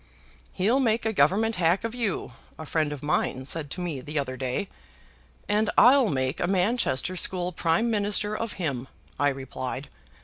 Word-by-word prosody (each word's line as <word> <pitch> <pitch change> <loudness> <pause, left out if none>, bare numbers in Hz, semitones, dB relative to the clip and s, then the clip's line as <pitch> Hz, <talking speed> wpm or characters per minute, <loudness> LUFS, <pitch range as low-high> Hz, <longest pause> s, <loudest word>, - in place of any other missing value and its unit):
'He'll 220 +8 +2
make 230 -3 +1
a 220 - +1
Government 205 +8 +2
hack 175 +3 +2
of 230 0 -3
you,' 230 -7 -2 0.2
a 160 - -7
friend 155 -1 0
of 145 -2 -6
mine 130 -3 0
said 150 +1 -2
to 180 - -5
me 160 -7 -3
the 150 +4 -6
other 130 -2 -1
day. 130 +10 -2 0.8
'And 210 +1 +2
I'll 255 -2 +7
make 130 0 -1
a - - 0
Manchester 185 - +1
school 180 0 -1
Prime 170 +7 +1
Minister 210 0 0
of 230 0 -3
him,' 135 -8 -3 0.3
I 145 - +4
replied. 130 0 -5
180 Hz, 170 wpm, -26 LUFS, 140-215 Hz, 0.8 s, I'll